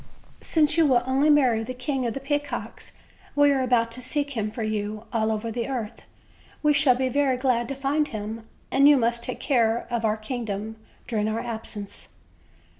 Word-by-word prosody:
"Since 315 0 +2
you 320 - +5
will 245 -3 +3
only 270 +3 +2
marry 255 -7 +4
the 255 +3 -6
King 255 0 -2
of 230 - -3
the - - -3
Peacocks, 275 -5 -4 0.4
we 290 0 +5
are 270 -1 +1
about 235 -2 +2
to 250 +2 -5
seek 285 +3 -1
him 220 -5 -2
for 225 +1 -5
you, 215 0 -3
all 220 -1 +1
over 220 +1 -3
the 235 0 -3
earth. 235 -4 -4 0.6
We 300 0 +4
shall 280 -3 +4
be 260 +1 0
very 265 0 +1
glad 250 -2 +1
to 275 - -4
find 280 +3 0
him, 220 0 -6 0.2
and 275 +2 +6
you 290 - +7
must 235 -1 +1
take - - -5
care 235 -4 +1
of 235 -1 -1
our 215 0 +1
kingdom 220 -2 -5 0.3
during 215 -3 -1
our 220 +1 -1
absence." 220 -3 -7
245 Hz, 190 wpm, -25 LUFS, 220-275 Hz, 0.6 s, you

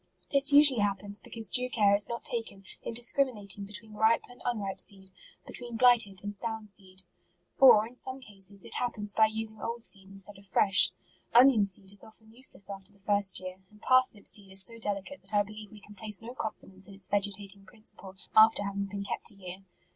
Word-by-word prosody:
This 280 +1 +5
usually 285 -4 +7
hap 205 -1 0
pens 205 +1 -1
because 225 -2 -4
due 250 +5 +3
care 205 -4 +3
is 200 0 +1
not 235 0 -5
taken 225 -5 -5 0.2
in 230 - -7
dis 240 0 +3
criminating 205 -7 -1
between 210 +2 -11
ripe 220 +2 +2
and 245 - -17
unripe 200 -5 -3
seed; 190 -1 -3 0.3
between 240 -2 -9
blighted 225 -6 +4
and 205 0 -5
sound 220 0 -6
seed. 190 -2 -14 0.6
Or 245 -5 +7
in 235 - -12
Borne 260 +1 -6
cases 200 -4 -6
it - - -10
happens 210 -4 0
by 220 0 +4
using 220 0 -3
old 235 0 -5
seed 195 -3 0
in 195 - -13
stead 195 +1 -6
of 200 - -19
fresh. 190 0 +4 0.5
Onion 240 -4 +6
seed 195 0 -2
is 200 - -4
often 220 0 -18
useless 245 -5 0
after 195 0 -10
the 200 - -24
first 200 -1 +2
year; 185 0 -9
and 210 - -21
parsnip 255 -4 +3
seed 195 -2 0
is 190 0 -4
so 230 +1 -12
delicate 205 +6 -4
that 215 - +3
I 205 - +3
believe 215 0 -11
we 215 - -13
can 210 - -15
place 210 0 +1
no 230 +2 -10
con* 220 -4 -5
fidence 190 -1 -9
in 200 - -13
its 195 -1 0
vegetating 200 -1 -2
principle 200 -4 -4 0.2
after 220 -1 +6
having 200 0 -4
been 200 0 -6
kept 200 - -5
a 205 - -20
year. 185 0 -11
205 Hz, 215 wpm, -29 LUFS, 195-225 Hz, 0.6 s, usually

